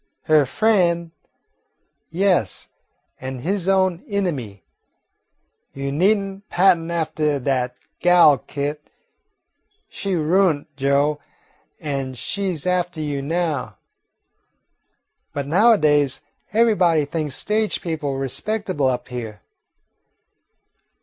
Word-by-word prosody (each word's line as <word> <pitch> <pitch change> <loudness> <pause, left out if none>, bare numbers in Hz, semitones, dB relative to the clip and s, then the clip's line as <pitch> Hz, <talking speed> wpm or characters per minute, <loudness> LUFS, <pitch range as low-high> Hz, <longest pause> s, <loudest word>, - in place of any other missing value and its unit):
"Her 155 -3 +4
frien', 170 - +1 1.0
yes, 180 - 0 0.5
an' 130 0 -5
his 185 +7 -2
own 190 -2 +2
inimy. 145 - -3 1.1
You 140 0 -4
need 190 +9 +3
n' 195 -1 -6
pattern 175 -3 +3
aftah 155 -3 0
dat 125 -2 -1 0.2
gal, 175 -6 +6
Kit. 145 +4 -4 1.1
She 195 -2 -3
ruint 160 -2 +1
Joe, 140 +2 +1 0.6
an' 135 -3 -3
she 190 +7 -2
's 155 - -4
aftah 180 -2 0
you 140 -2 -2
now." 160 -1 -2 1.6
"But 140 -1 -3
nowadays 150 - +3 0.3
everybody 190 -9 +3
thinks 150 -2 -3
stage 215 0 0
people 150 -5 -3
respectable 150 - -1
up 125 -1 -2
here." 110 -5 -6
160 Hz, 95 wpm, -21 LUFS, 140-185 Hz, 1.6 s, gal